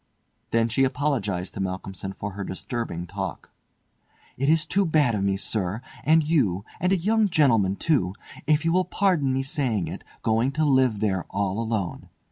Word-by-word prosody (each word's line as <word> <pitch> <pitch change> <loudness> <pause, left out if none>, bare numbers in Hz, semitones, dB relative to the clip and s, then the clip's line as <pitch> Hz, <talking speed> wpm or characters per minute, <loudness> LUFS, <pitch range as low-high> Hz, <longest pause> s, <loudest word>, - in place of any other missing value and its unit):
Then 115 0 +2
she 120 +4 +2
apologised 125 -10 -1
to - - -7
Malcolmson 95 0 -4
for 105 +1 -5
her 100 +1 -5
disturbing 95 -3 -4
talk. 95 0 -6 0.8
"It 135 +3 0
is 160 -1 +4
too 200 +1 +2
bad 155 -8 +3
of 100 -2 -1
me, 100 0 +1
sir, 100 0 -1 0.2
and 160 +1 +4
you—and 145 - 0
a 195 - +4
young 215 +4 +2
gentlemen, 115 - +3
too—if 150 - 0
you 165 - +3
will 185 +1 +2
pardon 180 -8 +1
me 135 +1 0
saying 130 - -1
it, - - -7 0.2
going 115 +5 +2
to 155 +2 +1
live 130 -7 +3
there 95 -4 0
all 100 +1 -1
alone. 110 -6 -3
115 Hz, 165 wpm, -25 LUFS, 95-150 Hz, 0.8 s, is